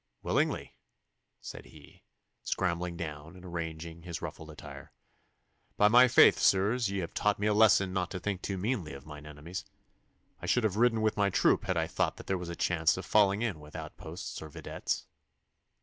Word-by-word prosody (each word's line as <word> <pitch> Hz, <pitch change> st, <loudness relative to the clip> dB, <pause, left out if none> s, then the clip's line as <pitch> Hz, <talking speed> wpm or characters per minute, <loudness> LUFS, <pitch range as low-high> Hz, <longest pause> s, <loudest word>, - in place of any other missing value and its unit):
'Willingly,' -, -, 0 dB, 0.7 s
said -, -, -9 dB
he, -, -, -16 dB, 0.4 s
scrambling 85 Hz, -1 st, -2 dB
down 80 Hz, 0 st, -7 dB
and 90 Hz, 0 st, -13 dB
arranging 85 Hz, -1 st, -6 dB
his 85 Hz, -1 st, -6 dB
ruffled 80 Hz, -, -7 dB
attire. 75 Hz, -, -11 dB, 0.9 s
'By 105 Hz, -, +5 dB
my 125 Hz, +3 st, +7 dB
faith, -, -, +6 dB
sirs, 105 Hz, +4 st, +3 dB
ye 100 Hz, -1 st, -2 dB
have 85 Hz, -, -6 dB
taught 105 Hz, -1 st, +1 dB
me 105 Hz, -, -2 dB
a 105 Hz, -, +3 dB
lesson 100 Hz, -3 st, +4 dB
not 90 Hz, -2 st, -1 dB
to 95 Hz, -, -5 dB
think 100 Hz, -1 st, -3 dB
too 95 Hz, -, -3 dB
meanly 95 Hz, -, -2 dB
of 70 Hz, +1 st, -10 dB
mine 75 Hz, -1 st, -10 dB
enemies. 75 Hz, +4 st, -7 dB, 0.8 s
I -, -, -5 dB
should 125 Hz, -, +2 dB
have 105 Hz, -3 st, +1 dB
ridden 115 Hz, -1 st, +3 dB
with 110 Hz, -1 st, +1 dB
my 100 Hz, -1 st, +3 dB
troop -, -, +2 dB
had -, -, 0 dB
I -, -, +1 dB
thought -, -, -1 dB
that -, -, -10 dB
there 95 Hz, -1 st, -1 dB
was 90 Hz, -1 st, -6 dB
a 85 Hz, -, -5 dB
chance 85 Hz, -1 st, +1 dB
of 95 Hz, -, -6 dB
falling 100 Hz, +1 st, +3 dB
in 100 Hz, -10 st, -2 dB
with 75 Hz, 0 st, -14 dB
outposts -, -, -7 dB
or 80 Hz, -, -8 dB
videttes. -, -, -4 dB
90 Hz, 190 wpm, -30 LUFS, 80-105 Hz, 0.9 s, my